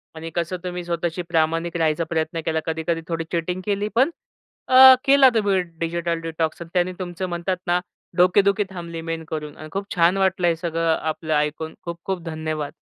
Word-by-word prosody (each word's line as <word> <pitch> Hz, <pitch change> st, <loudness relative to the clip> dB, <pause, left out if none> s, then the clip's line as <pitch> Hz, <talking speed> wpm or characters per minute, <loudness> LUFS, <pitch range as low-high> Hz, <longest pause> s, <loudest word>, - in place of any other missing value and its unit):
आणि 160 Hz, +1 st, -6 dB
कसं 170 Hz, +1 st, -1 dB
तुम्ही 180 Hz, -1 st, -4 dB
स्वतःशी 170 Hz, 0 st, -2 dB
प्रामाणिक 165 Hz, +1 st, 0 dB
राहायचा 160 Hz, 0 st, +1 dB
प्रयत्न 160 Hz, 0 st, -1 dB
केला. 160 Hz, 0 st, 0 dB
कधी-कधी 160 Hz, +1 st, -2 dB
थोडी 165 Hz, -1 st, -2 dB
चीटिंग 180 Hz, +2 st, -2 dB
केली. 205 Hz, 0 st, 0 dB
पण 260 Hz, +6 st, +4 dB, 0.6 s
अ, 260 Hz, 0 st, +10 dB
केला 275 Hz, -1 st, +7 dB
तुम्ही 200 Hz, -3 st, +2 dB, 0.2 s
डिजिटल 170 Hz, 0 st, -1 dB
डिटॉक्स 165 Hz, 0 st, -3 dB
आणि 170 Hz, -, -8 dB
त्यांनी 180 Hz, 0 st, +1 dB
तुमचं 180 Hz, 0 st, -4 dB
म्हणतात 175 Hz, +2 st, -2 dB
ना, 175 Hz, +1 st, +3 dB, 0.4 s
डोकेदुखी 200 Hz, +3 st, +4 dB
थांबली 170 Hz, -3 st, -7 dB
मेन 165 Hz, 0 st, -4 dB
करून 150 Hz, -2 st, -5 dB
आणि 155 Hz, -, -9 dB
खूप 195 Hz, +2 st, -3 dB
छान 175 Hz, +2 st, +4 dB
वाटलं 190 Hz, -2 st, +2 dB
आहे 170 Hz, -, +3 dB
सगळं 165 Hz, 0 st, 0 dB
आपलं 155 Hz, 0 st, -3 dB
ऐकून. 150 Hz, +2 st, -1 dB
खूप-खूप 175 Hz, +2 st, -4 dB
धन्यवाद. 155 Hz, -2 st, -4 dB
170 Hz, 175 wpm, -23 LUFS, 160-185 Hz, 0.6 s, अ